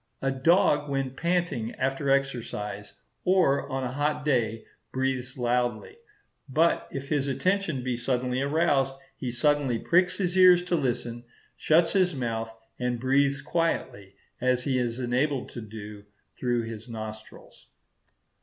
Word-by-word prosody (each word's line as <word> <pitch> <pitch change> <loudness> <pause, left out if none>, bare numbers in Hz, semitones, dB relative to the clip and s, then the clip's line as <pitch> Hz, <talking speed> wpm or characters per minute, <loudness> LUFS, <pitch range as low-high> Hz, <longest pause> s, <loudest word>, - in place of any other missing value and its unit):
A 135 - +2
dog 150 +2 +3
when 135 -1 -1
panting 170 -6 -1
after 135 +2 -1
exercise, 115 -7 -2 0.3
or 180 -7 +3
on 135 0 -2
a 125 - -2
hot 150 +2 -1
day, 115 -6 0 0.3
breathes 130 -1 -2
loudly; 120 - -1 0.5
but 160 +5 +2
if 135 0 -6
his 145 -3 +1
attention 170 -1 0
be 125 -1 -1
suddenly 125 +1 -1
aroused, 140 -2 +2 0.2
he 130 - -6
instantly 130 +1 +1
pricks 180 +8 +2
his 180 -2 -1
ears 180 -1 +7
to 180 -1 0
listen, 120 -4 -2 0.3
shuts 165 +2 +3
his 185 -4 +2
mouth, 115 -3 -3 0.3
and 125 -1 -1
breathes 135 +2 +2
quietly, 125 - -2 0.3
as 125 0 +2
he 130 -3 +1
is 120 0 -2
enabled 130 +2 0
to 120 - -7
do, 105 -1 -9 0.3
through 120 -2 0
his 115 +1 -8
nostrils. 110 -1 -9
130 Hz, 135 wpm, -27 LUFS, 120-150 Hz, 0.5 s, ears